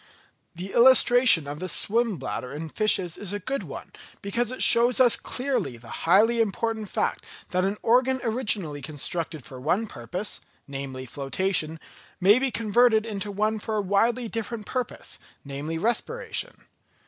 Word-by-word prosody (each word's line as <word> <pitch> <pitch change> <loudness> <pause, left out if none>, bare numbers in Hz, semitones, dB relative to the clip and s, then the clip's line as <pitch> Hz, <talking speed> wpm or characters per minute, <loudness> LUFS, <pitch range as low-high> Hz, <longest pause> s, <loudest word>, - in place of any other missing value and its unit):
The 185 +3 -7
illustration 245 - +6
of 145 +1 -7
the 185 +1 -4
swim 225 +6 +2
bladder 125 -4 -5
in 160 +2 -6
fishes 190 -4 +1
is 205 -1 -3
a 205 - -3
good 270 +8 -3
one, - - -9 0.3
because 230 +4 -1
it 255 - +1
shows 240 +1 +6
us 245 -3 +5
clearly 255 - -3
the 115 0 -10
highly 225 +5 +4
important 220 0 -2
fact - - -2 0.3
that 185 0 +1
an 195 +2 -1
organ 255 +3 +2
originally 210 - 0
constructed 155 -1 -5
for 130 +1 -10
one 180 - 0
purpose, 180 - -5 0.3
namely 135 -2 -7
flotation, 155 +5 -2 0.4
may 205 +6 +5
be 270 0 0
converted 230 -1 +2
into 205 -2 -4
one 215 +2 -1
for 220 +1 -4
a 210 - +1
widely 230 +5 +1
different 225 -1 -5
purpose, 250 -3 -5 0.3
namely 145 +4 -5
respiration. 465 - -3
205 Hz, 150 wpm, -25 LUFS, 165-235 Hz, 0.4 s, illustration